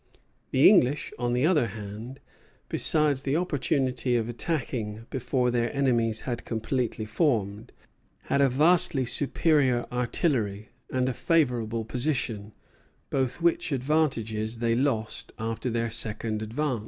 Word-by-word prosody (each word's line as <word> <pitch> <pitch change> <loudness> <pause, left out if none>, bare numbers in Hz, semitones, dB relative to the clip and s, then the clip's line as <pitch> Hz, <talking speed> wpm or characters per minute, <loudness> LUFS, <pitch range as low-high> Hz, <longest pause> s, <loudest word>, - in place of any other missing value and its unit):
The 130 - +5
English, 145 -8 +3
on 120 -1 0
the 125 +4 +2
other 155 -8 +3
hand, 110 +5 -8 0.5
besides 150 -4 +2
the 140 +1 -1
opportunity 135 -6 0
of 115 -2 0
attacking 120 -5 -3
before 125 -1 0
their 120 -1 0
enemies 120 -5 +1
had 120 -2 -4
completely 115 -1 -2
formed, 110 - -1 0.5
had 140 - +1
a 135 - +5
vastly 150 -1 +3
superior 135 -2 +2
artillery 120 - -1 0.2
and 130 0 0
a 130 - 0
favorable 120 -8 0
position, 120 -5 -2 0.6
both 130 +4 -1
which 170 -2 +2
advantages 120 -6 0
they 115 0 +1
lost 115 -3 -1
after 115 +3 -3
their 115 -1 -1
second 110 -1 0
advance. 120 +3 -2
125 Hz, 125 wpm, -27 LUFS, 115-140 Hz, 0.6 s, The